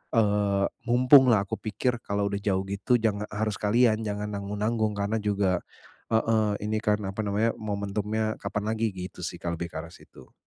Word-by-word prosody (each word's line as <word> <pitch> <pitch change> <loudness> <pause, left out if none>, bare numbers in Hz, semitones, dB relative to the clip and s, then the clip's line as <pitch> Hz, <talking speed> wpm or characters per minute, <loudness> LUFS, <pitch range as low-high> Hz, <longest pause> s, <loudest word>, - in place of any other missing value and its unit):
eee, 105 -2 +2 0.2
mumpung 130 +2 +7
lah 105 -5 +4
aku 100 - -5
pikir 115 +3 -1
kalau 100 -1 -1
udah 100 - -2
jauh 95 -2 0
gitu 100 +5 +1
jangan 105 -2 0
harus 110 0 -2
sekalian 110 +1 +3
jangan 105 -1 -3
nanggung-nanggung 105 +2 -1
karena 105 +2 -1
juga 100 -3 +1 0.5
heeh 110 -2 +2
ini 110 +1 -1
kan 105 -1 +1
apa 95 - -8
namanya, 105 +3 +1
momentumnya 105 +1 -2
kapan 105 - -3
lagi, 110 -2 0
gitu 90 -1 -7
sih 85 - -6
Kak, 85 -1 -2
lebih 85 - -3
ke - - -5
arah 80 - -10
situ. - - -17
105 Hz, 180 wpm, -27 LUFS, 100-110 Hz, 0.5 s, mumpung